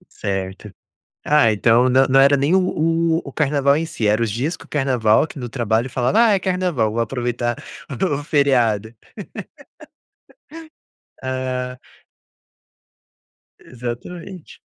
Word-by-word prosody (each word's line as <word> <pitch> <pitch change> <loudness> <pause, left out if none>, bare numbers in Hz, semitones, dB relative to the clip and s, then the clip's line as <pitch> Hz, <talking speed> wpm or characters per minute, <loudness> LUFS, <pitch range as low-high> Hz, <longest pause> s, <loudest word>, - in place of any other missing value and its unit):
Certo. 95 0 -4 0.5
Ah, 145 -7 +4
então 115 +4 +3
não 130 +1 +4
não 135 +1 +4
era 140 +1 +5
nem 140 +6 +1
o - - +6 0.6
o-o 140 -5 -6
carnaval 140 -1 +2
em 165 - -1
si, 115 -9 -3
era 105 +3 +2
os 110 - 0
dias 140 - -2
que - - -15
o - - -19
carnaval, 130 -3 +2
que 145 - -11
no 120 -2 -5
trabalho 120 0 -1
falava: 125 - +1
"Ah, 215 - +4
é - - +2
carnaval, 180 - 0
vou 115 - -1
aproveitar 120 0 -2 0.4
do 145 -7 -1
feriado". 120 -7 +1 2.3
Ah. 130 -1 -3 1.8
Exatamente. 145 +9 -8
130 Hz, 125 wpm, -20 LUFS, 115-145 Hz, 2.3 s, o